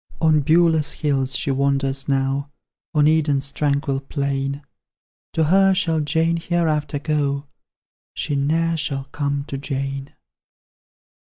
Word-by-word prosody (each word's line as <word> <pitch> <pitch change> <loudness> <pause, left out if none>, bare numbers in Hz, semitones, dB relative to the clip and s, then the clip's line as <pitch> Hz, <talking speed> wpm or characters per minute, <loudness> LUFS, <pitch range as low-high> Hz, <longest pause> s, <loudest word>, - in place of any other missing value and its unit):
On 160 -2 +4
Beulah's 160 +1 +3
hills 135 -3 0
she 140 - 0
wanders 135 0 0
now, 135 +1 0 0.5
On 150 -1 +5
Eden's 145 -3 +2
tranquil 140 -1 0
plain; 140 0 -3 0.7
To 160 - +2
her 190 +4 +4
shall 165 -4 +1
Jane 160 +3 +1
hereafter 160 -4 0
go, 145 -1 -1 0.7
She 145 - -2
ne'er 165 +4 +1
shall 140 -3 -2
come 140 -1 -1
to 140 -1 -6
Jane! 135 0 -4
145 Hz, 115 wpm, -22 LUFS, 140-160 Hz, 0.7 s, On